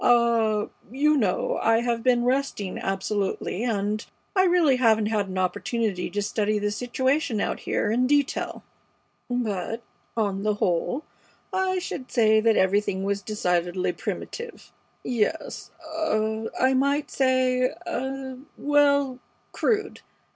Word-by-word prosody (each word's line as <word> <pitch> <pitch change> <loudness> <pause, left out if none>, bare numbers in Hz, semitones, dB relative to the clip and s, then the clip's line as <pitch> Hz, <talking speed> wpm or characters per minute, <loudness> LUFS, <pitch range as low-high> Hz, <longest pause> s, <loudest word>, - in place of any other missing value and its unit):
Ah 230 -3 +3 0.2
you 295 +5 +3
know 210 -10 +1
I 225 0 +3
have 235 -1 0
been 245 0 +3
resting 250 -7 -1
absolutely, 195 +1 -2
and 210 -2 -1 0.3
I 375 -1 +5
really 345 -7 +4
haven't 220 -3 +4
had 205 -3 -1
opportunity 185 +1 -1
to 205 0 -2
study 210 +1 0
the 205 0 -1
situation 255 +2 0
out - - -1
here 210 - -1
in 250 +3 +2
detail; 285 0 0 0.7
but, 225 -2 -2 0.3
on 200 -3 0
the 210 0 +1
whole, 205 - 0 0.5
I 375 0 +1
should 320 -8 -5
say 220 -3 +4
that 225 0 +3
everything 190 0 +2
was 200 0 -1
decidedly 180 -3 0
primitive; 470 0 -6 0.3
yes 245 +6 -2 0.2
ah 220 -9 -1
I 260 +1 +4
might 280 +3 +1
say 255 -1 +2 0.2
ah 265 -4 -4 0.2
well, 285 -3 +3 0.3
crude. 425 -3 0
235 Hz, 125 wpm, -25 LUFS, 210-270 Hz, 0.7 s, I